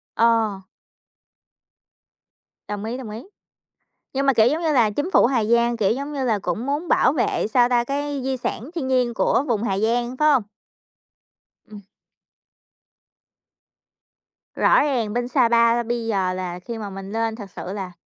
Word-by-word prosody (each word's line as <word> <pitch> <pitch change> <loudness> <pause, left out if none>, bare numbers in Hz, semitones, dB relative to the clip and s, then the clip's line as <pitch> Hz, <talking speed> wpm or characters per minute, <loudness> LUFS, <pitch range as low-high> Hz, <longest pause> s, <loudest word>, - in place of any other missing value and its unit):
Ờ. 225 -3 +2 2.1
Đồng 205 0 -5
ý, 235 +3 -4
đồng 255 -4 -8
ý. 220 +3 -7 0.9
Nhưng 275 +1 0
mà, 275 - +4
kiểu, 225 -1 +4
giống 305 +6 0
như 320 -2 +1
là, 235 -6 +4
chính 290 - -3
phủ - - +5
Hà 240 -2 +1
Giang, 235 +2 +2
kiểu, 205 -4 +2
giống 280 +5 -3
như 275 -2 -2
là, 220 -4 +1
cũng 190 +5 -3
muốn 290 +5 -2
bảo - - +3
vệ, 250 -6 0
sao 240 +2 +3
ta, 240 -1 +2
cái 285 +2 -3
di 265 0 -2
sản 245 +1 -4
thiên 280 -6 -3
nhiên 250 -2 +1
của 240 - +1
vùng 225 -4 0
Hà 195 -4 -1
Giang, 240 +3 0
phải 305 +1 +4
hông? 265 -6 +3 1.2
Ừm. 210 -1 -12 2.7
Rõ - - +4
ràng 240 -8 -1
bên 245 0 -1
Sa 250 -2 +2
Pa 235 0 +3
bây 235 0 -3
giờ 190 -4 0
là 180 -1 -5
khi 230 +5 -7
mà 210 -2 -6
mình 195 0 -8
lên 225 0 -1
thực 205 -4 -9
sự 185 0 -7
là 190 -3 -5
235 Hz, 175 wpm, -22 LUFS, 215-260 Hz, 2.7 s, phủ